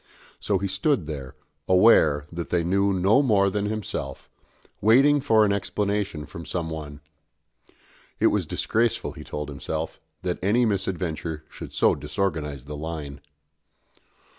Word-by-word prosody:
So 100 - 0
he 100 +2 -2
stood 100 - +1
there, 70 -2 -6 0.3
aware 90 -7 +5
that 85 0 -5
they 85 -1 +1
knew 100 +3 +2
no 95 +7 +4
more 100 -7 +3
than 105 +1 -1
himself, 105 - -5 0.5
waiting 135 +7 +5
for 110 -6 +4
an 100 - +2
explanation 100 -5 -2
from 80 +3 -9
some 80 0 -3
one. 75 -2 -7 1.2
It - - +2
was - - 0
disgraceful, 115 +1 0
he - - -10
told 75 0 -5
himself, 70 -2 -5 0.2
that 90 -1 -2
any 115 +6 +3
misadventure 90 -6 -2
should - - -9
so - - +3
disorganise 75 -8 -3
the 75 +1 -6
line. 75 -2 -6
90 Hz, 140 wpm, -25 LUFS, 75-105 Hz, 1.2 s, aware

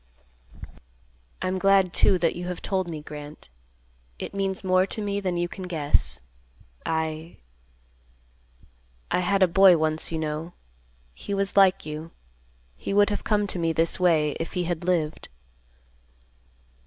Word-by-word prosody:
"I'm 185 0 -1
glad, 195 -2 +3
too, 190 - +4
that 170 -2 0
you 175 +1 -5
have 180 -1 -4
told 185 -2 -2
me, 155 -2 -6
Grant. 150 - -10 0.7
It - - -6
means 195 -1 -2
more 185 0 +3
to - - -5
me 200 -1 -2
than 185 -3 -2
you 175 0 0
can 185 +1 -8
guess. 145 - 0 0.7
I—I 160 0 -3 1.8
had 195 +2 +2
a - - +6
boy 185 0 +6
once, 155 +1 0
you 165 - -2
know. 155 +2 -4 0.6
He 200 - -5
was 195 0 -1
like 195 -2 +4
you. 155 +1 -6 0.7
He 195 - -4
would 205 +1 +4
have 205 - -3
come 210 -1 +1
to 185 -2 -2
me 165 -1 0
this 165 +2 +2
way, 160 -4 +3
if 165 - -4
he 180 - -1
had 175 -1 -3
lived." 165 -4 -1
175 Hz, 145 wpm, -25 LUFS, 160-190 Hz, 1.8 s, a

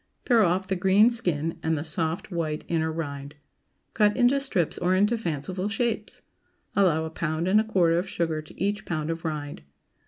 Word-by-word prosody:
Pare 235 -3 +4
off 185 0 +2
the 190 - 0
green 195 +5 +4
skin, 165 -8 -1
and 160 0 0
the 145 - -3
soft, 160 +3 -3
white, 155 -3 -3
inner 160 -1 0
rind. 145 -3 -6 0.6
Cut 210 0 +3
into 255 +2 +4
strips 205 - 0
or 180 +1 +2
into 205 +5 +3
fanciful 185 0 -3
shapes. 225 -1 -2 0.5
Allow 165 -5 +3
a 160 - -6
pound 160 +1 -2
and 210 +3 +5
a - - -2
quarter 175 -6 +2
of 185 +2 -4
sugar 165 -4 -1
to 155 - -16
each 200 +1 -1
pound 155 -1 -2
of 165 0 -5
rind. 150 -3 -4
175 Hz, 185 wpm, -26 LUFS, 160-205 Hz, 0.6 s, and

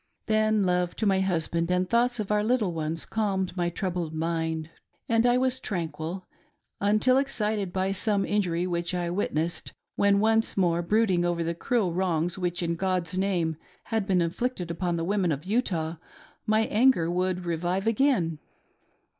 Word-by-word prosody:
Then 215 -1 +2
love 180 -1 0
to 220 - -2
my 195 -2 +3
husband, 170 -2 0
and 180 0 +1
thoughts 240 +3 +2
of 210 -1 -3
our 210 0 +2
little 215 -5 +1
ones 160 0 -3
calmed 195 -4 -1
my 175 -2 0
troubled 175 -3 -3
mind, 160 0 -2 0.4
and 230 +1 +3
I 245 0 +4
was 260 0 +1
tranquil, 170 - -4 0.5
until 215 +6 +3
excited 210 -8 -1
by 190 +1 0
some 200 0 +1
injury 180 -4 0
which 175 0 -2
I 175 -1 -1
witnessed, 170 -3 -2 0.2
when 200 0 +4
once 225 +1 +2
more 175 -3 +2
brooding 190 -1 +2
over 175 -1 0
the 165 +1 -1
cruel 190 +1 0
wrongs 175 -2 0
which, 175 -2 -2
in 170 0 0
God's 185 -2 -1
name, 180 -5 0 0.3
had 220 -3 -2
been 185 -3 +3
inflicted 175 +1 -2
upon 175 +1 -1
the 165 - -2
women 190 -2 +1
of 145 +2 -3
Utah, 175 -7 -1 0.5
my 215 +1 +3
anger 220 -6 +3
would 180 0 -1
revive 175 +3 -1
again. 225 - +2
185 Hz, 165 wpm, -27 LUFS, 170-210 Hz, 0.5 s, I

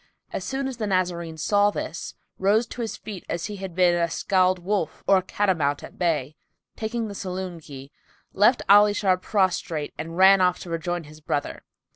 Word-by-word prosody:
As - - -3
soon 270 0 -2
as 260 -3 -6
the 215 -3 -2
Nazarene 175 -4 -1
saw 205 +6 +3
this, 170 -4 -5 0.2
rose 210 +5 +3
to 240 - -7
his 225 - -4
feet 205 -4 -8
as 170 0 -2
he 210 - -6
had 190 -3 -7
been 180 -1 +4
a 170 -1 +1
scald 185 +2 +2
wolf 180 -3 -2
or 195 - +5
a - - +1
cat 205 +2 -1
o' 190 - +5
mount[FN#289] 145 -4 -1
at - - -12
bay 165 -6 +1
and, 145 - -18 0.4
taking 225 +1 -3
the 205 - -7
saloon 185 -2 -5
key, 140 -2 -11 0.4
left 215 +6 +4
Ali 205 +1 +7
Shar 190 -3 +3
prostrate 185 -6 -1
and 165 +2 -6
ran 190 +1 +7
off 180 -1 +3
to 175 - -8
rejoin 170 +1 -2
his 155 +1 -14
brother. 145 -1 -3
185 Hz, 205 wpm, -24 LUFS, 170-205 Hz, 0.4 s, Ali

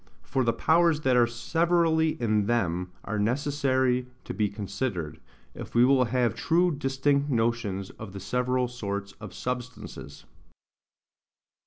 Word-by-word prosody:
For 135 -1 0
the 115 - +3
powers 160 +3 +3
that 130 -3 +2
are 120 -1 +5
severally 160 +6 +1
in 105 -3 +1
them 90 -6 0
are 110 -1 -3
necessary 130 +1 +1 0.2
to - - -6
be 105 -2 0
considered, 100 - -4 0.3
if - - -9
we 120 +1 +6
will 130 -1 +4
have 125 0 +1
true 175 +2 +2
distinct 140 +1 +1
notions 115 -6 -1
of 110 -3 -10
the 100 - -7
several 125 +4 0
sorts 100 -4 -4
of 105 -3 -7
substances. 125 +2 -6
125 Hz, 135 wpm, -27 LUFS, 105-140 Hz, 0.3 s, we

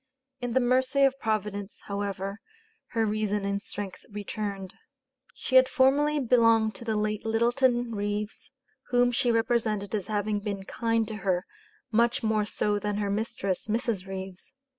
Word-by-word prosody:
In 245 -2 -3
the 260 - +4
mercy 260 +2 +3
of 270 0 +3
Providence, 210 -2 -2
however, 200 0 -3 0.5
her 225 -1 +2
reason 210 -1 -1
and 200 0 -1
strength 200 -2 -7
returned. 205 -2 -5 0.6
She 260 - +2
had 260 0 +6
formerly 290 +2 +3
belonged 230 -4 +4
to - - -10
the 225 -2 -1
late 210 0 -1
Littleton 240 +1 +2
Reeves, 205 0 -3 0.4
whom 245 0 +3
she 245 0 +2
represented 225 -3 0
as 205 -3 -2
having 210 -1 0
been 200 -2 -4
"kind" 230 +2 0
to 215 - -5
her, 185 -1 0 0.5
much 235 +2 +2
more 215 -1 +2
so 210 -1 0
than 205 0 -2
her 205 -1 -1
mistress 200 -3 -2
(Mrs. 220 -3 -1
Reeves). 190 -1 -7
215 Hz, 150 wpm, -28 LUFS, 205-235 Hz, 0.6 s, had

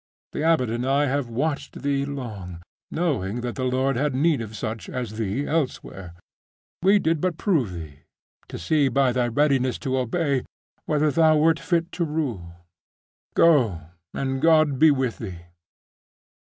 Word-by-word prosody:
The - - -4
abbot 155 -8 +2
and 120 +1 -2
I 140 +3 +2
have 140 -2 -1
watched 140 +6 -3
thee 140 -1 0
long, 105 -11 -7 0.3
knowing 125 - -1
that 120 -1 -3
the 130 - -3
Lord 130 +1 +1
bad 145 0 0
need 145 -1 +2
of 110 -1 -7
such 110 0 -5
as 115 -4 -5
thee 110 +6 -1
elsewhere. 125 - -3 0.7
We 195 +3 +5
did 160 -5 0
but 180 -3 -1
prove 155 - +1
thee, 80 -5 -9 0.5
to - - -7
see 140 - +2
by 135 0 +2
thy 120 0 +1
readiness 130 0 +1
to 130 0 +1
obey, 140 +2 0 0.5
whether 150 -1 +2
thou 160 0 +4
wert 160 +1 +3
fit 170 -1 -1
to 175 - -2
rule. 135 - -3 0.8
Go, 130 - +4 0.3
and 135 -1 -2
God 155 -4 +4
be 160 - +7
with 130 -5 0
thee. 90 -6 -7
135 Hz, 155 wpm, -24 LUFS, 115-155 Hz, 0.8 s, be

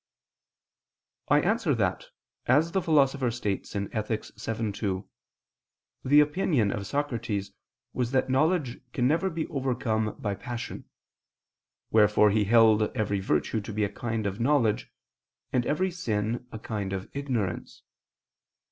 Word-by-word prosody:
I - - +5
answer - - +1
that, - - -1 0.4
As 150 +7 +4
the 190 - +1
Philosopher 140 -5 +3
states 105 -5 -3
(Ethic. 105 +2 -2
vii, 110 -1 -3
2), 100 -2 -3 1.0
the 145 +3 +6
opinion 150 - +2
of 100 -1 -4
Socrates 115 -8 -2 0.4
was 125 -2 -1
that 130 0 +1
knowledge 135 -1 +1
can 125 -1 +2
never 165 +7 +2
be 160 -2 -3
overcome 120 -5 -1
by 105 -2 -2
passion; 120 +4 -6 1.1
wherefore 105 -1 +5
he 105 0 +2
held 110 0 +5 0.2
every 105 -2 0
virtue 95 +4 0
to 105 - -7
be 105 0 -1
a 100 - +1
kind 115 -2 -3
of 100 +2 -2
knowledge, 120 -4 +1 0.6
and 125 -1 +1
every 185 +6 +1
sin 115 -8 -2
a - - -6
kind 105 -3 -4
of 95 0 -4
ignorance. 120 -11 -3
115 Hz, 130 wpm, -27 LUFS, 105-135 Hz, 1.1 s, the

